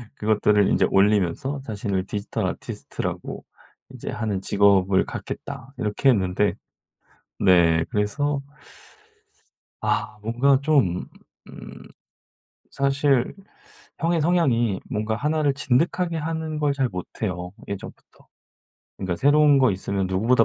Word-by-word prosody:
그것들을 105 Hz, -1 st, +2 dB
인제 -, -, +3 dB
올리면서 105 Hz, +7 st, +2 dB
자신을 100 Hz, -4 st, -2 dB
"디지털 100 Hz, 0 st, -3 dB
아티스트라고 -, -, -5 dB, 0.5 s
인제 -, -, -7 dB
하는 105 Hz, -4 st, -2 dB
직업을 100 Hz, -1 st, +3 dB
갖겠다." 135 Hz, +3 st, -7 dB
이렇게 125 Hz, +3 st, +1 dB
했는데 95 Hz, -1 st, +1 dB, 0.9 s
네 85 Hz, -4 st, +4 dB
그래서 140 Hz, +8 st, -1 dB, 1.4 s
아 -, -, -1 dB
뭔가 130 Hz, +5 st, +2 dB
좀 135 Hz, -, +2 dB, 0.4 s
음 -, -, -11 dB, 0.9 s
사실 140 Hz, -2 st, +1 dB, 0.7 s
형의 165 Hz, 0 st, +1 dB
성향이 125 Hz, -, +2 dB
뭔가 110 Hz, -2 st, -1 dB
1 155 Hz, +5 st, 0 dB
를 145 Hz, -2 st, +3 dB
진득하게 165 Hz, +6 st, 0 dB
하는 160 Hz, 0 st, -3 dB
걸 145 Hz, -1 st, +1 dB
잘 135 Hz, -2 st, 0 dB
못해요. 90 Hz, -2 st, -5 dB, 0.2 s
예전부터 100 Hz, -1 st, -9 dB, 0.7 s
그러니까 95 Hz, -3 st, -3 dB
새로운 145 Hz, -, +5 dB
거 130 Hz, -3 st, +4 dB
있으면 95 Hz, 0 st, -2 dB
누구보다 115 Hz, +6 st, +3 dB
115 Hz, 255 characters per minute, -24 LUFS, 100-140 Hz, 1.4 s, 새로운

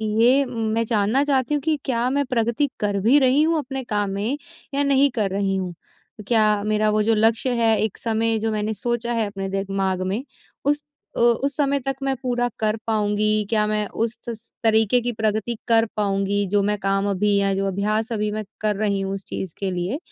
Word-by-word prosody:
ये 250 Hz, +5 st, +5 dB
मैं 225 Hz, -2 st, -1 dB
जानना 220 Hz, +4 st, +2 dB
चाहती 275 Hz, -1 st, +1 dB
हूँ 295 Hz, -, +1 dB
कि 315 Hz, +1 st, 0 dB
क्या 245 Hz, -1 st, 0 dB
मैं 280 Hz, +2 st, 0 dB
प्रगति 245 Hz, +3 st, 0 dB
कर 205 Hz, -1 st, 0 dB
भी 235 Hz, +9 st, +5 dB
रही 265 Hz, +2 st, +4 dB
हूँ 325 Hz, +1 st, +2 dB
अपने 270 Hz, -2 st, -4 dB
काम 205 Hz, -4 st, -1 dB
में 210 Hz, +8 st, -2 dB, 0.4 s
या 280 Hz, +1 st, +1 dB
नहीं 280 Hz, 0 st, +4 dB
कर 210 Hz, -4 st, +1 dB
रही 195 Hz, 0 st, 0 dB
हूँ। 185 Hz, -2 st, -3 dB, 0.5 s
क्या 215 Hz, -3 st, +3 dB
मेरा 215 Hz, 0 st, +2 dB
वो 215 Hz, 0 st, +2 dB
जो 225 Hz, +2 st, +3 dB
लक्ष्य 225 Hz, +4 st, +2 dB
है, 225 Hz, -2 st, +3 dB
एक 215 Hz, -2 st, -2 dB
समय 225 Hz, 0 st, 0 dB
जो 220 Hz, +1 st, -1 dB
मैंने 215 Hz, 0 st, -1 dB
सोचा 235 Hz, +3 st, -2 dB
है 230 Hz, -2 st, +1 dB
अपने 195 Hz, -1 st, -5 dB
दिमाग 195 Hz, -1 st, -1 dB
में 205 Hz, +7 st, -2 dB, 0.4 s
उस 295 Hz, +1 st, +1 dB, 0.3 s
अ, -, -, -1 dB
उस 240 Hz, +4 st, +2 dB
समय 280 Hz, -1 st, +2 dB
तक 270 Hz, +1 st, -3 dB
मैं 270 Hz, 0 st, 0 dB
पूरा 245 Hz, -1 st, 0 dB
कर 215 Hz, -1 st, +1 dB
पाऊँगी। 215 Hz, -1 st, +1 dB
क्या 215 Hz, -2 st, +2 dB
मैं 210 Hz, 0 st, 0 dB
उस 230 Hz, +2 st, -3 dB
स 225 Hz, -1 st, -8 dB
तरीके 225 Hz, +1 st, +4 dB
की 245 Hz, +1 st, -1 dB
प्रगति 220 Hz, +1 st, -1 dB
कर 225 Hz, -1 st, +5 dB
पाऊँगी 200 Hz, 0 st, 0 dB
जो 205 Hz, -1 st, +3 dB
मैं 210 Hz, +1 st, +1 dB
काम 195 Hz, +1 st, 0 dB
अभी 200 Hz, +1 st, +1 dB
या 200 Hz, 0 st, +2 dB
जो 195 Hz, +1 st, -1 dB
अभ्यास 210 Hz, +4 st, -1 dB
अभी 210 Hz, -1 st, -1 dB
मैं 215 Hz, +1 st, -3 dB, 0.2 s
कर 215 Hz, -1 st, +1 dB
रही 200 Hz, -1 st, 0 dB
हूँ 195 Hz, 0 st, -2 dB
उस 195 Hz, -, -8 dB
चीज़ 185 Hz, -4 st, -5 dB
के 195 Hz, -1 st, -1 dB
लिए, 180 Hz, +8 st, -2 dB
220 Hz, 210 wpm, -22 LUFS, 205-245 Hz, 0.5 s, ये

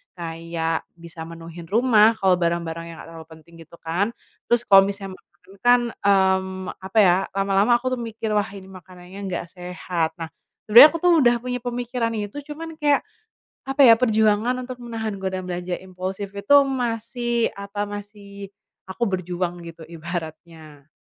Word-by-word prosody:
Kayak 165 Hz, -1 st, -4 dB
bisa 170 Hz, -1 st, -12 dB
menuhin 165 Hz, 0 st, -10 dB
rumah, 225 Hz, -1 st, +4 dB
kalo 190 Hz, -1 st, +3 dB
barang-barang 170 Hz, -1 st, -2 dB
yang 165 Hz, -, -9 dB
nggak -, -, -11 dB
terlalu 160 Hz, -1 st, -11 dB
penting 160 Hz, +1 st, -16 dB
gitu 165 Hz, -, -15 dB
kan, 175 Hz, +7 st, 0 dB, 0.4 s
terus 240 Hz, 0 st, +2 dB
kalo 195 Hz, -1 st, +7 dB
misalnya 195 Hz, -1 st, -6 dB
makanan 180 Hz, +3 st, -22 dB
kan, 245 Hz, 0 st, +5 dB, 0.2 s
mmm, 190 Hz, -1 st, +2 dB, 0.2 s
apa 190 Hz, +4 st, -6 dB
ya, 180 Hz, -1 st, +5 dB, 0.2 s
lama-lama 200 Hz, +4 st, +3 dB
aku 255 Hz, +1 st, -3 dB
tuh 250 Hz, -, -3 dB
mikir, 225 Hz, -1 st, -5 dB
"Wah, 210 Hz, 0 st, +1 dB
ini 190 Hz, -1 st, -10 dB
makanannya 185 Hz, +1 st, -13 dB
nggak 175 Hz, -1 st, -3 dB
sehat." 180 Hz, -2 st, -3 dB
Nah, 165 Hz, -1 st, -7 dB, 0.3 s
sebenarnya 235 Hz, +7 st, +10 dB
aku 330 Hz, -, -4 dB
tuh 355 Hz, -, +5 dB
udah 240 Hz, -1 st, +4 dB
punya 250 Hz, 0 st, -3 dB
pemikiran 245 Hz, -1 st, -2 dB
itu 210 Hz, +7 st, -5 dB
cuman 325 Hz, +1 st, -8 dB
kayak, 290 Hz, -2 st, +2 dB, 0.6 s
apa 270 Hz, +1 st, 0 dB
ya, 230 Hz, -2 st, +9 dB
perjuangan 220 Hz, 0 st, +2 dB
untuk 255 Hz, -, -6 dB
menahan 225 Hz, -3 st, -4 dB
godaan 185 Hz, -1 st, -3 dB
belanja 180 Hz, 0 st, -4 dB
impulsif 190 Hz, +2 st, -6 dB
itu 200 Hz, +8 st, +3 dB
masih 240 Hz, -1 st, -1 dB
apa 200 Hz, +1 st, -5 dB
masih 200 Hz, -1 st, -9 dB, 0.4 s
aku 215 Hz, +6 st, -3 dB
berjuang 180 Hz, -1 st, -3 dB
gitu 165 Hz, -1 st, -11 dB
ibaratnya. 160 Hz, -3 st, -8 dB
195 Hz, 155 wpm, -23 LUFS, 175-230 Hz, 0.6 s, sebenarnya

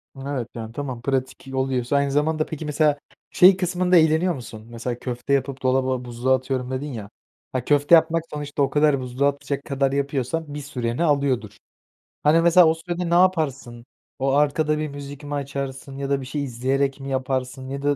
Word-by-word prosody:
Evet, 135 Hz, -3 st, -4 dB
yani, 115 Hz, -1 st, -6 dB
tamam, 130 Hz, -2 st, -5 dB
pratik 130 Hz, 0 st, -3 dB
oluyorsa 130 Hz, 0 st, 0 dB
Aynı 140 Hz, -1 st, +2 dB
zamanda 155 Hz, +2 st, +1 dB
peki 160 Hz, 0 st, -6 dB
mesela 150 Hz, -1 st, +2 dB, 0.3 s
şey 185 Hz, +1 st, +7 dB
kısmında 180 Hz, 0 st, +2 dB
eğleniyor 160 Hz, +3 st, +3 dB
musun? 110 Hz, -3 st, -9 dB
Mesela, 120 Hz, +1 st, -5 dB
"Köfte 125 Hz, +2 st, -3 dB
yapıp 135 Hz, 0 st, -1 dB
dolaba, 130 Hz, -1 st, +1 dB
buzluğa 125 Hz, +2 st, +1 dB
atıyorum." 130 Hz, 0 st, -3 dB
dedin 135 Hz, +3 st, -3 dB
ya. 105 Hz, -4 st, -7 dB, 0.4 s
Ha, 130 Hz, -2 st, -3 dB
köfte 145 Hz, +3 st, +5 dB
yapmak 165 Hz, 0 st, +3 dB
sonuçta 145 Hz, -1 st, -4 dB
o 135 Hz, -, +1 dB
kadar 145 Hz, -1 st, +3 dB
buzluğa 130 Hz, +3 st, +1 dB
atacak 140 Hz, 0 st, -4 dB
kadar 135 Hz, -1 st, 0 dB
yapıyorsan 140 Hz, +2 st, -2 dB
bir 150 Hz, -, -4 dB
süreni 125 Hz, -1 st, -2 dB
alıyordur. 140 Hz, -8 st, 0 dB, 0.7 s
Hani, 155 Hz, +3 st, +5 dB
mesela 170 Hz, 0 st, +6 dB
o 160 Hz, -, +4 dB
sürede 175 Hz, +1 st, -4 dB
ne -, -, +1 dB
yaparsın? 145 Hz, -10 st, +1 dB, 0.3 s
O 135 Hz, +1 st, +1 dB
arkada 150 Hz, +2 st, +2 dB
bir 155 Hz, 0 st, -2 dB
müzik 145 Hz, 0 st, -9 dB
mi 145 Hz, 0 st, -6 dB
açarsın 135 Hz, -1 st, -5 dB
ya 140 Hz, 0 st, -4 dB
da 140 Hz, -1 st, +1 dB
bir -, -, -7 dB
şey 145 Hz, +3 st, -3 dB
izleyerek 135 Hz, +2 st, -1 dB
mi 135 Hz, 0 st, -6 dB
yaparsın 130 Hz, 0 st, -2 dB
ya 140 Hz, +1 st, -4 dB
da 145 Hz, 0 st, +2 dB
140 Hz, 185 wpm, -23 LUFS, 130-150 Hz, 0.7 s, şey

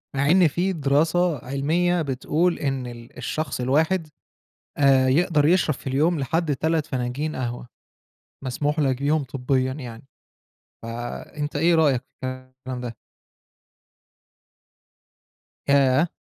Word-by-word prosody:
مع 140 Hz, +2 st, +2 dB
إن 180 Hz, -1 st, +6 dB
في 180 Hz, +5 st, 0 dB
دراسة 160 Hz, +3 st, +2 dB
علمية 165 Hz, +7 st, +1 dB
بتقول 155 Hz, +5 st, 0 dB
إن 135 Hz, -3 st, -2 dB
ال 120 Hz, 0 st, -11 dB
الشخص 135 Hz, +2 st, -3 dB
الواحد، 160 Hz, +7 st, +1 dB, 0.7 s
آآ 135 Hz, -2 st, +4 dB
يقدر 150 Hz, +2 st, +3 dB
يشرب 165 Hz, -2 st, +3 dB
في -, -, -10 dB
اليوم 150 Hz, +5 st, +1 dB
لحد 155 Hz, +2 st, 0 dB
3 160 Hz, +2 st, 0 dB
فناجين 130 Hz, +3 st, -3 dB
قهوة، 120 Hz, -1 st, -4 dB, 0.8 s
مسموح 145 Hz, +4 st, -1 dB
لَك 135 Hz, -3 st, +2 dB
بيهُم 150 Hz, +2 st, +2 dB
طبيًا 130 Hz, 0 st, -1 dB
يعني، 125 Hz, -3 st, -8 dB, 0.8 s
فأنت 120 Hz, +6 st, -5 dB
إيه 165 Hz, +3 st, +3 dB
رأيك 145 Hz, -6 st, +3 dB, 0.2 s
في -, -, -3 dB
الكلام 130 Hz, 0 st, -7 dB
ده؟ 120 Hz, -2 st, -6 dB, 2.7 s
ياه! 140 Hz, +2 st, +4 dB
140 Hz, 115 wpm, -24 LUFS, 130-160 Hz, 2.7 s, إن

